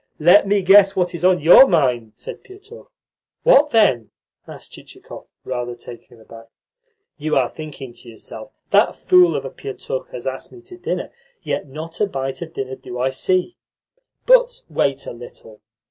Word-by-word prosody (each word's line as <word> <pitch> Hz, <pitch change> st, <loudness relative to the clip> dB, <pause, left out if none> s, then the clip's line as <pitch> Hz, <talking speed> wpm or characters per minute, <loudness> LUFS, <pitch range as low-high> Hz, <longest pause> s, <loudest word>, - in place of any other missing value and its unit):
"Let 175 Hz, +6 st, +5 dB
me 200 Hz, -1 st, +1 dB
guess 195 Hz, +1 st, +5 dB
what 180 Hz, -1 st, -1 dB
is 170 Hz, 0 st, -7 dB
in 185 Hz, -2 st, +3 dB
your 175 Hz, -, +8 dB
mind," 125 Hz, -, 0 dB
said -, -, -10 dB
Pietukh. 405 Hz, +4 st, -15 dB, 0.5 s
"What, 300 Hz, -, +5 dB
then?" 170 Hz, -, +2 dB, 0.4 s
asked -, -, -13 dB
Chichikov, -, -, -13 dB, 0.2 s
rather 120 Hz, -1 st, -5 dB
taken 120 Hz, 0 st, -14 dB
aback. 115 Hz, +1 st, -15 dB, 0.7 s
"You 155 Hz, +1 st, -2 dB
are 130 Hz, -2 st, +2 dB
thinking 145 Hz, -5 st, -10 dB
to 120 Hz, -, -14 dB
yourself: 115 Hz, -, -11 dB, 0.2 s
'That -, -, +3 dB
fool 360 Hz, -1 st, +3 dB
of -, -, -4 dB
a -, -, -6 dB
Pietukh 485 Hz, +4 st, -7 dB
has -, -, -9 dB
asked -, -, -6 dB
me 360 Hz, -, -15 dB
to 360 Hz, 0 st, -13 dB
dinner, 360 Hz, -, -4 dB, 0.3 s
yet -, -, -4 dB
not 160 Hz, +6 st, -9 dB
a 210 Hz, -, +2 dB
bite 135 Hz, -5 st, -5 dB
of 165 Hz, -1 st, -8 dB
dinner 130 Hz, -1 st, -5 dB
do 125 Hz, -, -9 dB
I 130 Hz, +1 st, 0 dB
see.' 185 Hz, -, -1 dB, 0.7 s
But -, -, +3 dB
wait 140 Hz, 0 st, -1 dB
a -, -, -7 dB
little. 115 Hz, -2 st, -14 dB
165 Hz, 170 wpm, -19 LUFS, -, 0.7 s, your